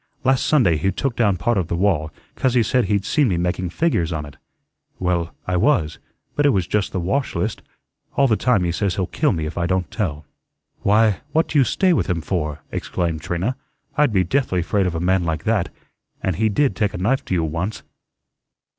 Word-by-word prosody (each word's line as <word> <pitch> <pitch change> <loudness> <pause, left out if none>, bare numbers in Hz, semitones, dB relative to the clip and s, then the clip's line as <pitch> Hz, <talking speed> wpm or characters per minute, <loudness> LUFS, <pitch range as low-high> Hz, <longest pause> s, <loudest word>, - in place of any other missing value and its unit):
Last 130 -1 +2
Sunday 100 - +4
he 95 +6 +1
took 125 +6 -2
down 105 -5 +2
part 110 +4 +1
of 90 - -2
the 85 - -2
wall, 85 -4 +1 0.2
'cause 130 -2 0
he 120 - +5
said 125 +2 +2
he'd 100 0 0
seen 145 -4 +2
me 90 -6 0
making 90 +1 -1
figures 90 - 0
on 80 -2 -3
it. 75 -1 -12 0.6
Well, 85 -2 -1
I 90 -1 0
was, 90 - +2 0.4
but 145 - +2
it 145 - +5
was 95 -9 +1
just 105 +1 -1
the 95 - -2
wash 130 +11 -1
list. 110 0 -2 0.5
All 140 - +4
the 110 - +3
time 120 -5 +2
he 85 - 0
says 95 +1 -1
he'll 95 - 0
kill 150 - +1
me 80 -4 -2
if 75 +3 -4
I 85 - 0
don't 95 -1 -1
tell." 75 -9 -3 0.5
"Why, 105 0 +3
what 160 +1 +3
do 150 - +2
you - - +6
stay 185 +8 +2
with - - +1
him 85 -2 0
for?" 75 -4 -3
exclaimed 85 -3 -2
Trina. 90 +10 -2 0.4
"I'd 150 -3 +3
be 95 -3 +3
deathly 90 -4 0
'fraid 95 +1 +1
of 85 - -3
a - - -1
man 90 +1 +2
like 80 -2 -2
that; 110 -5 +1 0.5
and 95 -3 -1
he 110 +1 +2
did 135 +6 +1
take 105 -3 0
a - - -3
knife 115 +9 +1
to 95 - -1
you 85 - +1
once." 85 +7 -3
95 Hz, 220 wpm, -21 LUFS, 85-120 Hz, 0.6 s, you